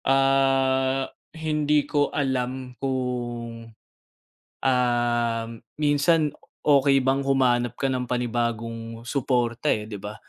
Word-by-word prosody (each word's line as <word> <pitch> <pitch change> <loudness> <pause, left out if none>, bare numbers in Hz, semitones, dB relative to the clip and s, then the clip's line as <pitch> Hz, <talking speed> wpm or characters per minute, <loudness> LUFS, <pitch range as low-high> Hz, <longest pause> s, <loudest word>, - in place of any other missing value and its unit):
Ah, 135 0 +2 0.2
hindi 150 -2 +1
ko 145 -1 +1
alam 130 -2 -2
kung, 120 -3 -3 0.9
um, 120 -3 +1 0.3
minsan 150 +1 +2 0.3
okey 140 -2 +4
bang 135 +1 +2
humanap 120 -3 +2
ka 135 +1 -1
ng 125 -1 -2
panibagong 115 -1 -3
supporta, 120 0 -1
eh, 110 -7 +2
'di 105 -1 -7
ba? 105 +2 -7
130 Hz, 100 wpm, -25 LUFS, 120-135 Hz, 0.9 s, okey